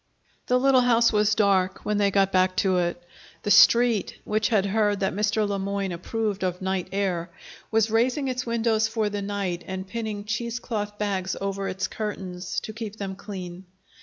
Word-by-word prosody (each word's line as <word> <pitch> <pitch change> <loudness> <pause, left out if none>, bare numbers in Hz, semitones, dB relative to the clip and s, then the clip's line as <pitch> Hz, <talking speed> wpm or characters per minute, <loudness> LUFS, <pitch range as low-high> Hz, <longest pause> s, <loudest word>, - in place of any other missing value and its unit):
The 250 - +3
little 265 -1 +5
house 235 -2 +4
was 210 0 +3
dark 195 -3 +1
when 210 -1 0
they 200 -1 +3
got 195 0 +2
back 185 0 +2
to 185 -1 +2
it. 175 0 -2 0.4
The 205 - 0
Street, 230 0 +5
which 215 0 0
had 205 -4 +2
heard 205 0 +1
that 190 - 0
Mr. 210 +1 +1
Le 200 -1 -2
Moyne 195 0 -2
approved 205 +3 -3
of 180 -1 -1
night 190 -1 -2
air, 185 -3 -1 0.4
was 225 -1 +2
raising 250 +5 +1
its 250 -1 -2
windows 225 -2 +1
for 220 -1 -1
the 205 0 -3
night 195 -3 -3
and 190 0 -5
pinning 215 -1 -4
cheesecloth 220 -1 -3
bags 190 -3 -1
over 195 0 -3
its 185 +1 -2
curtains 190 -4 -4
to 215 - -7
keep 215 -2 -6
them 195 -2 -5
clean. 185 -2 -8
205 Hz, 180 wpm, -25 LUFS, 190-220 Hz, 0.4 s, little